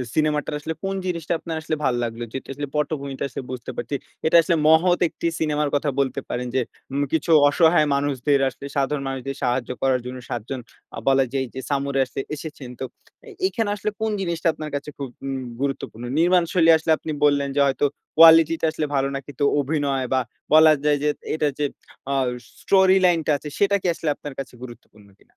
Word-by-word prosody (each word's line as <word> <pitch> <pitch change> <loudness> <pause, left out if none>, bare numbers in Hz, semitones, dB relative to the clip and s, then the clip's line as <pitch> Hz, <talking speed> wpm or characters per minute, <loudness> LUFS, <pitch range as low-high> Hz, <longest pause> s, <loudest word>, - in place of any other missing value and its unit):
সিনেমাটার 150 -1 +1
আসলে 160 +2 -4
কোন 195 0 -2
জিনিসটা 170 -2 -2
আপনার 165 -1 -5
আসলে 155 0 -2
ভাল 130 - +2
লাগলো 115 0 -4
যেহেতু 135 - -6
আসলে 145 +1 -5
পটভূমিটা 140 -3 -2
আসলে 135 - -6
বুঝতে 125 -2 -6
পারছি। 120 +4 -3 0.3
এটা 160 +2 +6
আসলে 170 0 +1
মহৎ 175 +3 +5
একটি 170 - -3
সিনেমার 150 -2 0
কথা 145 0 +1
বলতে 135 -2 0
পারেন 125 +1 -3
যে 130 - +3 0.3
উম 140 - 0
কিছু 160 +1 +1 0.2
অসহায় 160 0 +4
মানুষদের 140 0 +1
আসলে 140 - -11
সাধারণ 140 +1 0
মানুষদের 135 0 -4
সাহায্য 125 0 0
করার 130 -1 +2
জন্য 130 +1 -6
৭ 120 - -3
জন 135 -2 -3 0.4
আ - - -3
বলা 135 0 +4
যায় 135 -1 0
যে 130 - -6
সামুরাই 140 -1 +1
আসছে 125 - -7 0.2
এসেছেন। 150 -4 -8
তো 130 - -3 0.6
এখানে 225 - -2
আসলে 210 +1 -2
কোন 220 - 0
জিনিসটা 170 -1 -1
আপনার 155 0 -6
কাছে 145 +1 -4
খুব 140 -3 -5 0.2
উম 135 -1 -3 0.2
গুরুত্বপূর্ণ? 135 -4 -3 0.2
নির্মাণ 175 +1 +4
শৈলী 165 -2 +5
আসলে 160 0 -1
আপনি 155 - -6
বললেন 140 -1 +2
যে - - +1
হয়তো 135 +1 +1 0.3
কোয়ালিটি 165 0 +8
টা - - +2
আসলে 155 -1 -2
ভালো 135 0 +2
না। 140 - -2
কিন্তু 145 0 -4 0.2
অভিনয় 140 -2 0
বা 130 - +3 0.3
বলা 155 0 +8
যায় 150 -1 +3
যে 150 - +3 0.2
এটার 150 -2 +1
যে 145 - +1 0.5
আ - - +1 0.5
স্টোরি 190 -1 +5
লাইন 175 -2 +4
টা - - +3
আছে 150 - -10
সেটা 200 0 +3
কি - - -2
আসলে 165 -1 -3
আপনার 145 -2 -8
কাছে 135 - -6
গুরুত্বপূর্ণ 110 -4 -13
কিনা? - - -28
145 Hz, 200 wpm, -23 LUFS, 135-160 Hz, 0.6 s, কোয়ালিটি